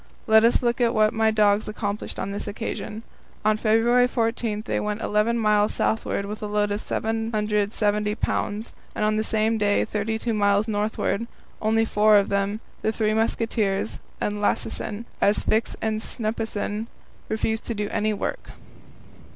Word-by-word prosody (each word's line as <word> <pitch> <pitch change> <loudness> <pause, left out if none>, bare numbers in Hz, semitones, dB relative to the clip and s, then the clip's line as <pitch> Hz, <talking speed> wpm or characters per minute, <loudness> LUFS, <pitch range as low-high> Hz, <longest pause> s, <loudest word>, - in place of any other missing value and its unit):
Let 220 0 +6
us 235 +2 +3
look 240 +1 +1
at 235 0 +2
what 215 0 +4
my 220 0 +3
dogs 210 -1 +3
accomplished 210 -1 -4
on 200 - -3
this 200 - -5
occasion: 220 +1 -5 0.4
On 215 0 +4
February 230 +3 +3
14 230 -3 -1
they - - -1
went 210 0 -2
eleven 220 +2 +1
miles 210 -1 +2
southward 220 -2 0
with 210 +1 -6
a 210 - -3
load 205 0 0
of 205 +1 -1
770 210 -1 0
pounds, 215 0 -2 0.2
and 215 - 0
on 215 0 +2
the 215 - +1
same 220 0 +1
day 205 -1 +2
thirty 215 +1 -2
two 230 +1 -2
miles 205 0 +2
northward 215 +1 -1 0.3
only 225 +1 +2
four 210 -1 +5
of 200 - +2
them, 200 +2 0 0.2
the 220 - +1
"Three 215 -1 0
Musketeers" 220 -2 0 0.2
and 205 0 -2
Lassesen, 210 +1 -2 0.2
as 205 +1 +4
Fix 220 +1 0
and 220 -1 0
Snuppesen 220 -1 -2 0.4
refused 220 0 -1
to 230 - -3
do 210 0 -2
any 215 +1 +1
work. 355 - -4
215 Hz, 160 wpm, -24 LUFS, 210-225 Hz, 0.4 s, Let